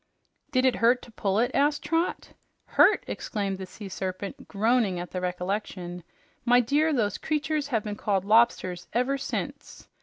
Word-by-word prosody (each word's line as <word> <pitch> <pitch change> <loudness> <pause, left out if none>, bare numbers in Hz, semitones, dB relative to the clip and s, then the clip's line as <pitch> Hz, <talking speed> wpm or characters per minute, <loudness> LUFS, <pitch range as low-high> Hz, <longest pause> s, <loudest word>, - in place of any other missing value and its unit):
"Did 255 -3 +2
it 255 - +3
hurt 240 +2 +3
to 235 - -13
pull 200 -2 -1
it?" 245 +3 +2
asked 290 +1 +2
Trot. 330 +1 -1 0.4
"Hurt!" - - +4
exclaimed 200 -3 -3
the 190 - -6
Sea 205 +2 -9
Serpent, 195 +7 -5
groaning 215 -3 +1
at 175 - -6
the 180 - -3
recollection. 180 -1 -3 0.4
"My 245 +1 +5
dear, 290 +6 +2
those 215 -8 0
creatures 300 -1 -1
have 225 -7 0
been 210 -1 -4
called 195 -2 0
lobsters 205 -5 +3
ever 265 +3 +1
since! - - -5
220 Hz, 160 wpm, -27 LUFS, 190-260 Hz, 0.4 s, My